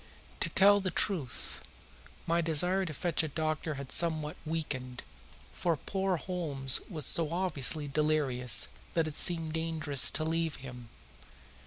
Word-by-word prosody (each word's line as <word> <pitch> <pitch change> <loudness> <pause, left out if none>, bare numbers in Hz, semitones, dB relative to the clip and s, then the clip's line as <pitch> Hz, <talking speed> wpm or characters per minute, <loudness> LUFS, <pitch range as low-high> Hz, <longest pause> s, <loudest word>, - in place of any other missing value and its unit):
To - - +1
tell 205 +1 +5
the 190 -1 -2
truth, 170 - -1 0.6
my 170 +1 +1
desire 180 +4 +2
to - - -5
fetch 175 +2 0
a 160 - -2
doctor 155 0 -3
had 140 -1 -8
somewhat 155 -3 +2
weakened, 135 -6 -4 0.5
for 170 -3 -1
poor 190 +2 -2
Holmes 150 -7 0
was 155 -7 -1
so 165 -3 +1
obviously 160 -4 +1
delirious 140 -5 +1 0.3
that 165 -2 +1
it 150 - -7
seemed 165 -3 +1
dangerous 160 -4 +2
to 155 - +2
leave 165 -1 -1
him. 125 -3 -10
160 Hz, 140 wpm, -30 LUFS, 145-170 Hz, 0.6 s, tell